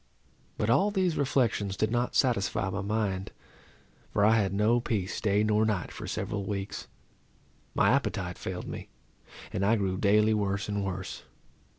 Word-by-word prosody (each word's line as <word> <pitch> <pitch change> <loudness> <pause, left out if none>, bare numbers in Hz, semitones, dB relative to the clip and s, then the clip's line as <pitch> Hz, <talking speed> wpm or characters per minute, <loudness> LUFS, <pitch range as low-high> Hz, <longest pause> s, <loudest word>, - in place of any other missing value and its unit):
But 105 - +1
all 195 +12 +4
these 185 -5 +1
reflections 115 -8 +1
did 110 +3 +1
not 120 +1 0
satisfy 105 -5 +1
my 100 +2 -2
mind, 100 -2 -1 0.8
for 105 - +3
I 110 +1 +5
had 100 -3 +1
no 105 +4 +3
peace 105 -6 -2
day 105 -1 +2
nor 105 0 +3
night 105 -5 -1
for - - -7
several 100 -2 -3
weeks. 100 0 -4 0.9
My - - +4
appetite - - -1
failed - - -5
me, - - -7 0.6
and 95 - -1
I 105 +3 +4
grew 95 -3 -1
daily 105 +1 +4
worse 100 -1 -1
and 100 -1 -1
worse. 95 -1 -4
105 Hz, 160 wpm, -29 LUFS, 100-110 Hz, 0.9 s, I